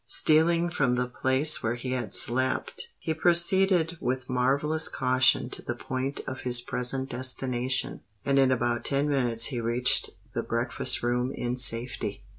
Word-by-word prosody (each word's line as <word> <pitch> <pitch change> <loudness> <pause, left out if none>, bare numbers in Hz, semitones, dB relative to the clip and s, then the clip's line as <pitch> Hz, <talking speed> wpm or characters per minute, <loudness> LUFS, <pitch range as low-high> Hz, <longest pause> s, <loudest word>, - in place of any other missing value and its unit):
Stealing 170 +2 +2
from 135 -7 0
the 125 0 -1
place 130 +4 +2
where 115 +1 -2
he 125 +1 -7
had 120 -6 -2
slept, 130 +2 +1
he 160 - -4
proceeded 175 0 +2
with 130 0 -3
marvellous 140 +5 0
caution 130 -1 +1
to - - -5
the 120 - -6
point 130 +3 -5
of 130 0 -7
his 125 -1 +3
present 125 +2 -2
destination; 130 0 -2 0.2
and 140 0 +1
in 135 -1 +3
about 120 -1 -1
ten 140 +1 -1
minutes 120 -5 +2
he 120 - -3
reached 120 +2 +4 0.2
the - - -2
breakfast - - 0
room 125 +1 -1
in 120 0 -4
safety. 120 -1 0
130 Hz, 155 wpm, -26 LUFS, 125-140 Hz, 0.2 s, reached